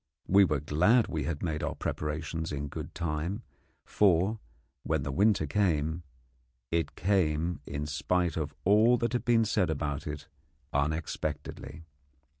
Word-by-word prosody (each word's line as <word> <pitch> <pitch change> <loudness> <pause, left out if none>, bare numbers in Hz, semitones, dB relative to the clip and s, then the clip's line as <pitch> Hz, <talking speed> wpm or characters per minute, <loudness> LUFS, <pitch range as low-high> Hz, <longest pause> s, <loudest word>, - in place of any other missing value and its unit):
We 100 +1 +6
were 75 -5 0
glad 90 +11 +3
we 80 -4 -2
had 75 -1 -3
made 80 -3 -2
our - - -2
preparations 80 +2 -3
in 75 0 -3
good - - -7
time, 85 +7 -2 0.4
for, 100 +2 +3 0.4
when 80 -3 -1
the 70 - -3
winter 100 +1 +3
came, 80 -1 0 0.7
it 85 0 -1
came, 85 -3 +1
in 75 +1 -3
spite 85 +4 0
of 80 -3 -3
all 110 +5 +5
that 115 +1 -1
had 120 0 -1
been 115 -2 +4
said 100 -4 +1
about 75 -2 -2
it, 75 -1 -6 0.5
unexpectedly. 75 +2 -3
80 Hz, 140 wpm, -30 LUFS, 75-100 Hz, 0.7 s, We